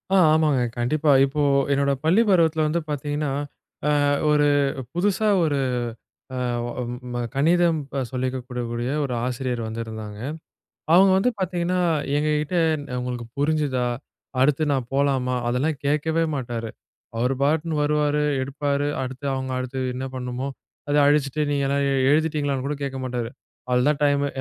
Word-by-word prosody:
ஆ - - +6 0.2
ஆமாங்க. 155 -5 +3 0.2
கண்டிப்பா. 145 +5 +2
இப்போ 140 +2 0 0.3
என்னோட 140 0 +2
பள்ளி 180 +8 +4
பருவத்தில 160 -4 +3
வந்து 170 +3 0
பார்த்தீங்கன்னா, 145 +1 -2 0.8
அ - - +3 0.2
ஒரு 150 -1 +4 0.5
புதுசா 205 +4 +1 0.2
ஒரு 145 -3 +1 0.8
அ - - -3 0.3
ஒ - - -4 0.4
ம 120 - -2
கணிதம் 165 +3 +3 0.3
சொல்லிக்குடுக்கக்கூடிய 125 -1 -3
ஒரு 130 -3 -2
ஆசிரியர் 125 -1 -2
வந்திருந்தாங்க. 110 -2 -6 0.7
அவுங்க 190 +2 +7
வந்து 245 +6 +2
பார்த்தீங்கன்னா, 180 0 0 0.4
எங்க 150 +1 0
கிட்டே, 170 +3 0 0.4
"உங்களுக்கு 125 -1 -4
புரிஞ்சுதா? 145 -4 +1 0.6
அடுத்து 150 +2 +3
நான் 130 -3 -1
போலாமா?" 135 -2 +1
அதெல்லாம் 135 +5 0
கேட்கவே 155 +3 +1
மாட்டாரு. 120 -4 -4 0.5
அவரு 125 +3 +1
பாட்டுன்னு 155 +2 +1
வருவாரு, 150 0 +1 0.2
எடுப்பாரு. 140 +1 -1
அடுத்து 130 +2 -5
அவுங்க, 130 0 -3
அடுத்தது 130 0 -3
என்ன 130 +1 -3
பண்ணமோ 125 +1 -4 0.4
அதை 145 - +3
அழிச்சுட்டு, 145 0 +1
நீங்கள்லாம் 140 0 +1 0.3
எழுதிட்டீங்களான்னு 145 -3 +1
கூட 150 - -2
கேட்க 135 -1 -4
மாட்டாரு. 120 -2 -3 0.4
"அவ்ளோதான் 135 +4 +2
டைமு 145 0 +2
140 Hz, 130 wpm, -23 LUFS, 125-155 Hz, 0.8 s, அவுங்க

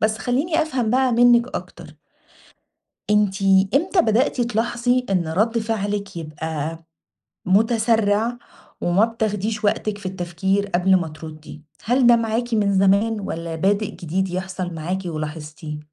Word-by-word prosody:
بس 215 0 +1
خليني 285 +8 0
أفهم 260 -8 -1
بقى 260 +1 +2
منكِ 240 +1 +5
أكتر - - -10 1.1
أنتِ 210 -1 +2 0.3
إمتى 355 +5 +3
بدأتِ 245 +1 +1
تلاحظي 240 +2 0
إن 180 -4 0
رد 215 +8 +1
فعلِك 205 -4 -3
يبقى 160 0 -5 0.6
متسرع 220 +2 +2 0.4
وما 180 +5 +3
بتاخديش 215 -1 -2
وقتِك 205 0 0
في 200 - -14
التفكير 190 +2 -1
قبل 190 0 +3
ما 170 -3 0
تردي؟ 155 -1 -11 0.2
هل 245 +1 +3
ده 240 - +7
معاكِ 230 +1 -1
من 205 -2 +2
زمان، 200 +3 +3
والّا 165 -4 -5
بادئ 200 +5 0
جديد 185 +3 -2
يحصل 185 -1 -4
معاكِ 170 +4 -3
ولاحظتيه؟ 155 -1 -6
205 Hz, 130 wpm, -21 LUFS, 175-230 Hz, 1.1 s, ده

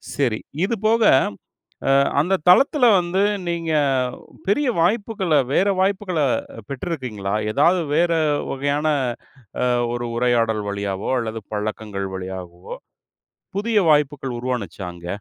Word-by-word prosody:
சரி. 120 -6 0 0.3
இதுபோக 225 +1 +1 0.9
அ - - +5 0.3
அந்த 180 +6 +2
தளத்தில 265 - +5
வந்து, 180 +2 -1 0.3
நீங்க 170 -1 -2 0.8
பெரிய 260 +7 +2
வாய்ப்புகள 195 -1 0 0.2
வேற 195 - +3
வாய்ப்புகள 190 -2 0 0.5
பெற்றிருக்கீங்களா? 125 - -4 0.2
ஏதாவது 170 +8 +3
வேற 170 +1 +3 0.4
வகையான 145 +3 -1 0.8
அ - - +2 0.3
ஒரு 120 0 -3
உரையாடல் 115 -3 +1
வழியாவோ 100 -1 -3
அல்லது 115 -1 -4
பழக்கங்கள் 105 -2 -3
வழியாகவோ 90 -2 -8 0.9
புதிய 220 +1 +1
வாய்ப்புகள் 145 -4 +1
உருவாச்சா 110 -7 -4
அங்க? 85 0 -12
140 Hz, 105 wpm, -21 LUFS, -, 0.9 s, அ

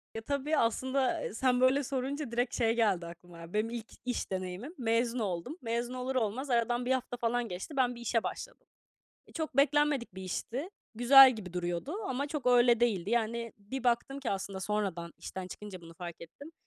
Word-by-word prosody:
Ya, 225 - -3
tabii, 285 +5 -1
aslında, 260 +3 +1
ı - - -10
sen 250 +1 +2
böyle 265 +2 +4
sorunca 270 0 -3
direkt 245 +1 0
şey 230 -1 +3
geldi 200 -7 +2
aklıma 170 0 -11
benim 215 +2 +1
ilk 235 -1 -5 0.2
iş 245 -5 -2
deneyimim. 185 - -4
Mezun 235 0 +1
oldum. 200 - -3
Mezun 235 +2 -2
olur 255 +1 -3
olmaz 255 +3 -1
aradan 240 0 +1
1 255 - 0
hafta 255 -1 -1
falan 240 0 0
geçti, 190 - -6
ben 250 -2 +2
bir 235 - -10
işe 235 -1 0
başladım. - - -6 0.7
Çok 315 -4 -4
beklenmedik 285 -5 +3
bir 190 - -7
işti. 245 - -4 0.2
Güzel 260 +3 +9
gibi 185 -5 -8
duruyordu 175 - -3 0.2
ama 265 +2 -1
çok 295 -3 -4
öyle 240 -1 +5
değildi. 205 -5 +1
Yani, 235 0 0
bir 230 +6 -6
baktım 245 +3 +1
ki 265 - -2
aslında 195 0 -3
sonradan 190 -5 -2
işten 190 0 -6
çıkınca 195 -2 -8
bunu 165 0 -13
fark 175 -1 -8
ettim. 280 - -11
235 Hz, 185 wpm, -31 LUFS, 200-260 Hz, 0.7 s, Güzel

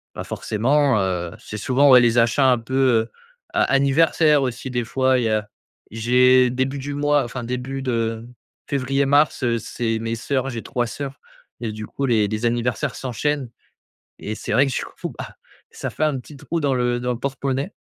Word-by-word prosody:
bah, - - -5
forcément, 130 +2 +1
heu, 90 -3 -2
c'est 105 - -8
souvent, 130 +5 +3
ouais, 125 -1 +9
les 120 0 +3
achats 125 +3 +4
un 125 - +2
peu, 130 +3 -6
heu, 120 -4 +2 0.4
a - - +3
anniversaires 145 +2 +3
aussi 125 +1 -4
des 120 -1 -1
fois 130 +1 +2
il 120 - 0
y 110 - +1
a 105 -1 0 0.4
j'ai 125 +2 +4
début 130 +2 -2
du 145 +2 -5
mois 145 -1 +2
enfin 120 +1 -6
début 125 +3 -4
de 115 -2 -2 0.4
février, 135 0 0
mars, 145 +1 +3
heu, 120 -1 +1
c'est 115 -1 -2
mes 115 0 -3
soeurs. 135 +3 -2
J'ai 115 -2 -5
3 120 -2 -1
soeurs 140 +2 -6 0.4
et 110 -2 -3
du 110 0 -7
coup 140 - -3
les 110 -5 +2
les 110 +2 -3
anniversaires 120 -1 -1
s'enchaînent 135 +1 -2 0.7
et 110 - -5
c'est - - -7
vrai 135 +5 +4
que 135 - -2
du - - -2
coup, - - -7
bah, - - -8 0.3
ça - - -5
fait - - -6
un 145 -4 0
petit 140 +3 -13
trou 155 +4 -4
dans 140 -2 +1
le 120 -1 0
dans 125 0 -1
le 120 - -5
porte-monnaie. 135 +5 -2
125 Hz, 200 wpm, -22 LUFS, 115-135 Hz, 0.7 s, ouais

